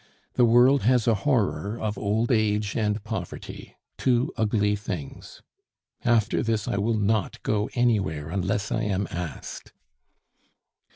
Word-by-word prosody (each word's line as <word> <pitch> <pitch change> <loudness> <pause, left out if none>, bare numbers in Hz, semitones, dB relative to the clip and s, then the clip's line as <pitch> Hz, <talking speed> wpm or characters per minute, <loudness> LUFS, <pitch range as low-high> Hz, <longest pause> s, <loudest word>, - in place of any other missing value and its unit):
"The 125 - +4
world 125 +4 +5
has 125 0 +2
a 115 - +5
horror 110 -3 0
of 110 -1 -2
old 110 +4 0
age 105 -2 +1
and 105 -2 0
poverty - - -7 0.2
two 125 +2 +1
ugly 105 -2 +1
things. 95 -8 -7 0.6
After 115 -4 +2
this 110 -3 -1
I - - -1
will 110 +3 +1
not 105 -2 0
go 105 0 0
anywhere 100 - +1
unless 100 +2 -1
I - - 0
am 100 -1 -1
asked." 85 -4 -6
105 Hz, 130 wpm, -25 LUFS, 100-115 Hz, 0.6 s, world